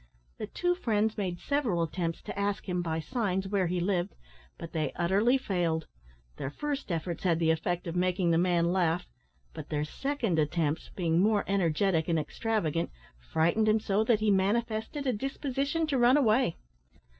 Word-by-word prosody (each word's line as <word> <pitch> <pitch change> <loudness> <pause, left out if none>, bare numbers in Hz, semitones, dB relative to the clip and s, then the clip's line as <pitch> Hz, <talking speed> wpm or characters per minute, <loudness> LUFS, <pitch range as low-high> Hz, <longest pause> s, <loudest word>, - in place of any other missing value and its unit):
The - - -4
two 355 0 0
friends 220 - 0
made 185 -4 -3
several 245 -13 0
attempts 165 0 -3
to - - -6
ask 200 0 -1
him, 180 -1 0
by 160 -2 -2
signs, 195 -1 -1
where 190 -2 +1
he 180 +1 -1
lived, 180 +1 -1 0.4
but 165 - -8
they 155 -4 -1
utterly 200 +9 +3
failed. 175 - -1 0.5
Their 135 - -3
first 290 - -4
efforts 170 +1 -3
had 175 -3 +3
the 165 -1 +3
effect 175 +2 -1
of 170 0 -4
making 180 -1 +1
the 165 - +3
man 175 -1 +2
laugh, 175 -1 +1 0.5
but - - -8
their 150 -1 -1
second 230 - -1
attempts, 155 0 0
being 170 -2 +1
more 205 +1 +3
energetic 180 -2 +1
and 165 -2 +2
extravagant, 165 -1 -1 0.4
frightened 170 +7 +3
him 215 +1 +4
so 210 0 +1
that 220 -2 +3
he 215 -1 +3
manifested 220 +7 0
a 255 - +2
disposition 275 +6 -1
to 280 -4 0
run 245 +3 +6
away. 240 - +3
190 Hz, 170 wpm, -29 LUFS, 170-225 Hz, 0.5 s, run